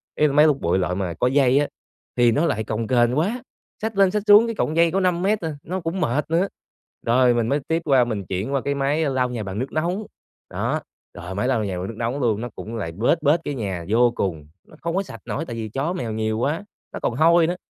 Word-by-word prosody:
ý 150 - +3
là 140 - -2
máy 150 +2 +6
hút 150 -3 +3
bụi 85 +2 +1
loại 90 -1 -1
mà 90 -3 -2
có 105 +9 0
dây 135 0 +4
á, 145 - +1 0.5
thì 120 -1 +4
nó 150 +8 +2
lại 110 -9 0
cồng 110 +1 -3
kềnh 120 +1 +2
quá, 215 +11 0 0.4
xách 220 -1 -3
lên 195 -2 +5
xách 210 0 -1
xuống 210 +2 +8
cái 230 - -3
cọng 155 - -1
dây 165 0 +4
có 190 - +1
5 180 -2 +1
mét 205 +3 +1
à, 160 -2 -3
nó 185 +3 -3
cũng 165 +3 -3
mệt 150 0 0
nữa. 175 +4 +2 0.6
Rồi 125 +1 +4
mình 120 -1 0
mới 140 +4 +1
tiếp 165 +1 0
qua 135 -4 +5
mình 105 -5 -3
chuyển 95 +9 -3
qua 135 - +1
cái 140 +2 -1
máy 140 +3 +1
lau 130 -2 0
nhà 120 -3 -4
bằng 95 +1 -5
nước 130 +3 -3
nóng, 175 +7 -1 0.4
đó, - - -2 0.3
rồi 90 +2 -7
máy 105 +5 0
lau 125 -5 +1
nhà 95 -2 -3
bằng 90 - -4
nước 115 - -7
nóng 120 +4 -2
luôn, 110 -4 +1
nó 120 - -4
cũng 115 +2 -7
lại 100 -7 -4
bết 115 - +1
bết 150 +3 +4
cái 145 - -3
nhà 95 -8 -4
vô 120 +2 +4
cùng, 80 -6 -3 0.2
nó - - -16
không 170 +1 -2
có 195 - +1
sạch 115 - -11
nổi 160 - -3
tại 120 - -6
vì 110 -1 -4
chó 140 - -2
mèo 120 -11 -3
nhiều 110 0 -1
quá, 150 - -1 0.3
nó - - -5
còn 115 - -1
hôi 165 +3 +5
nữa. 175 - -1
135 Hz, 270 wpm, -23 LUFS, 110-165 Hz, 0.6 s, xuống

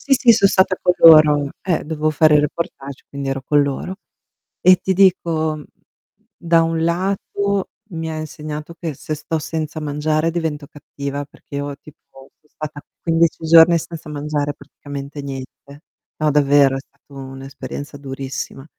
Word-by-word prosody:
Sì, 275 - +2
sì, 250 -2 +6
so 200 - +4
stata 190 -1 +3
co 180 - +3
loro. 150 -3 +7
Eh, 175 -4 -1
dovevo 155 0 -1
fare 155 0 +5
reportage, 140 -2 -5
quindi 140 -1 -5
ero 135 0 -2
con 145 +2 +3
loro. 140 +6 -3 0.7
E 185 0 +7
ti 190 - -1
dico, 165 -5 +2 0.7
da 165 -1 +3
un 165 0 -1
lato 195 +3 -1 0.2
mi 165 -1 -4
ha 155 - -5
insegnato 155 0 -7
che 165 -3 -4
se 155 - -5
sto 155 +2 -3
senza 155 0 -4
mangiare 155 +2 0
divento 160 -4 -3
cattiva, 140 -1 -6
perché 140 0 -13
io 145 0 -3
tipo 140 -2 -17
so 150 - -32
stata 150 -1 -7 0.2
15 165 -1 +1
giorni 165 +1 +7
senza 165 -1 -8
mangiare 145 0 -2
praticamente 145 0 -9
niente. 140 +1 -9 0.4
No, 155 -1 +1
davvero, 140 -1 +4
è - - -3
stato 140 +1 -20
un'esperienza 135 +2 -8
durissima. 135 0 -6
150 Hz, 150 wpm, -19 LUFS, 140-165 Hz, 0.7 s, loro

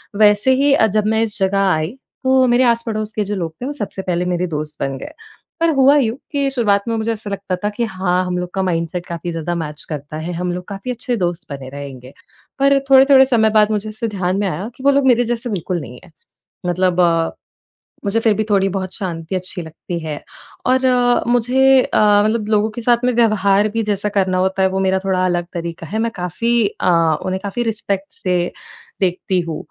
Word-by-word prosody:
वैसे 210 +4 +4
ही 285 -1 +4
अ, 220 -5 +4
जब 210 +1 0
मैं 220 +1 +2
इस 215 -3 -1
जगह 195 +1 +1
आई 160 +9 -2 0.3
तो 260 0 +4
मेरे 245 +1 +4
आस-पड़ोस 225 -2 -1
के 215 - -1
जो 205 +1 -3
लोग 165 -4 -4
थे - - -3
वो 285 - -3
सबसे 210 -7 -5
पहले 180 -2 -1
मेरे 180 0 0
दोस्त 150 -2 -4
बन 135 -1 -2
गए। - - -8 0.5
पर 335 - +3
हुआ 270 +1 +5
यूँ 240 -3 +1
कि 280 -2 0
शुरुआत 210 -6 +1
में 230 - 0
मुझे 225 +1 -1
ऐसा 210 -1 -8
लगता 195 -1 -3
था 210 - +1
कि 225 +3 -3
हाँ, 185 -3 -1
हम 180 0 -2
लोग 180 0 -3
का 190 - -1
माइंडसेट 175 0 -2
काफ़ी 170 0 -5
ज़्यादा 165 +1 -3
मैच 150 -2 -5
करता 150 0 -6
है, 160 +3 -4
हम 180 +1 -2
लोग 180 0 -6
काफ़ी 200 +5 -5
अच्छे 245 0 -2
दोस्त 175 -3 -2
बने 135 -2 -8
रहेंगे। 135 -2 -9 0.5
पर 275 0 +4
थोड़े-थोड़े 265 0 +7
समय 230 -4 +3
बाद 210 +1 +3
मुझे 215 0 -2
ऐसे 220 +2 -4
ध्यान 190 -3 -1
में 205 - 0
आया 185 +3 -3
कि 260 - -12
वो 280 - +5
लोग 280 -1 +2
मेरे 245 -1 +4
जैसे 240 +1 -3
बिल्कुल 180 -3 -2
नहीं 125 -2 -10
हैं। 180 - -17 0.5
मतलब 180 0 +1
अ, 165 -1 +2 0.7
मुझे 200 +3 +2
फिर 220 -2 +3
भी 215 +2 -1
थोड़ी 195 -1 +3
बहुत 190 -1 -4
शांति 170 -3 -4
अच्छी 185 -1 -3
लगती 165 +2 -6
है 155 -2 -6 0.4
और 260 +1 +3
अ, 245 -1 +3
मुझे 255 +2 +4
अ, 205 -1 +3
मतलब 215 -1 0
लोगों 215 0 +2
के 235 - -7
साथ 240 +1 +2
में 250 - +2
व्यवहार 210 -3 +3
भी 225 +1 -2
जैसा 210 0 -1
करना 190 -2 +1
होता 190 +1 0
है 190 - +3
वो 190 0 -2
मेरा 190 0 +1
थोड़ा 185 -1 +1
अलग 175 -1 0
तरीक़ा 170 -2 -5
है, 220 +2 -3
मैं 230 0 0
काफ़ी 225 +6 0 0.2
अ, 180 - +3 0.3
उन्हें 185 0 -1
काफ़ी 205 +4 -2
रिस्पेक्ट 200 -4 -3
से 180 -1 -1 0.5
देखती 185 0 0
हूँ। 165 -2 -5
200 Hz, 220 wpm, -18 LUFS, 180-230 Hz, 0.7 s, थोड़े-थोड़े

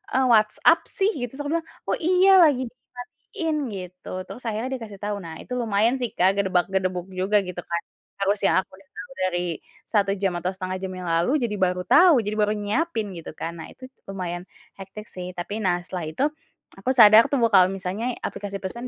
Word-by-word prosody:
eee, 260 0 +3
WhatsApp 215 -2 +4
sih?" 410 -2 +1
Gitu. 245 -3 -4
Terus 290 - -5
aku - - -3
bilang, 325 - -15 0.2
"Oh, - - +1
iya, 370 +3 +5
lagi 285 -6 +4
dimatiin," 305 - -6 0.2
gitu, 180 -1 -9 0.2
terus 250 - -9
akhirnya 225 +3 -2
dia 260 - -5
kasih 205 - -11
tahu. 205 0 -2
Nah, 165 -1 -8
itu 250 - -7
lumayan 225 +1 +2
sih 245 - -1
Kak 190 +2 +3
gedebak-gedebuk 185 -1 0
juga 190 +3 +2
gitu 180 -1 -6
kan. 170 0 -3 0.4
Harusnya 200 +1 +2
aku - - -41
udah 195 - -22
tau 285 - -9 0.2
dari 175 -1 -2 0.4
1 200 -3 +1
jam 195 -2 +1
atau 180 +2 -2
1/2 185 0 -4
jam 190 -1 -4
yang 185 - -7
lalu, 170 - +1
jadi 235 - -1
baru 180 -1 +1
tahu, 335 - +6
jadi 210 +1 -2
baru 210 0 +2
nyiapin 215 +1 -1
gitu 165 - -8
kan, 165 - -4
nah 160 - -7
itu 260 - -12 0.2
lumayan 180 -2 -4 0.4
hektik 195 +2 -9
sih 180 -1 -7
tapi, 200 +5 -4
nah 180 -2 +2
setelah 180 -3 -5
itu, 160 - -2 0.6
aku 195 - -3
sadar 220 -1 +8
tuh 285 - +2 0.2
kalau 185 -2 +7
misalnya 195 +5 -3
aplikasi 200 -1 -5
pesan 235 +6 -5
205 Hz, 195 wpm, -24 LUFS, 185-245 Hz, 0.6 s, sadar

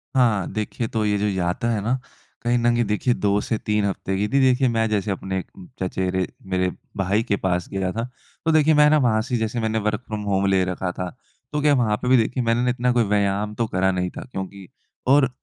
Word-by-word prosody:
हाँ, 115 -7 +3
देखिए 110 +2 -2
तो 110 -1 -1
ये 105 0 +2
जो 105 +1 0
यात्रा 95 +5 -1
है 105 -3 0
ना 125 +5 0 0.4
कहीं 120 +1 +2
न 120 0 +3
कहीं 120 0 +2
देखिए 105 +4 +1
2 100 -1 +1
से 115 - -1
3 105 -1 0
हफ़्ते 95 -1 -2
की 105 +1 0
थी। 140 +5 +2
देखिए 130 0 +4
मैं 115 -1 +1
जैसे 105 -1 0
अपने 95 0 -3
एक - - -8 0.3
चचेरे, 95 0 -1 0.2
मेरे 95 -1 0 0.3
भाई 100 +3 +1
के 100 - 0
पास 90 -2 -1
गया 95 -1 -1
था। 115 +3 -3 0.4
तो 160 - +3
देखिए 155 0 +4
मैं 150 0 +6
ना 155 - +5
वहाँ 115 -6 +2
से 125 +2 -6
ही - - 0
जैसे 110 +2 -1
मैंने 110 0 0
वर्क़ 105 +2 -1
फ्रॉम 110 -1 -4
होम 100 0 +2
ले 95 -1 +3
रखा 90 0 -2
था। 90 0 -4 0.4
तो 150 - 0
क्या 145 0 +4
वहाँ 110 -5 +2
पे 125 - -3
भी 130 - +6
देखिए 120 +2 0
मैंने 115 +1 +2
ना 125 - +2
इतना 125 0 +1
कोई 120 - +3
व्यायाम 100 0 0
तो 115 -2 0
करा 95 -1 +1
नहीं 90 -1 -1
था - - -4
क्योंकि 95 -1 -6 0.4
और 135 0 +5
105 Hz, 240 wpm, -23 LUFS, 95-120 Hz, 0.4 s, मैं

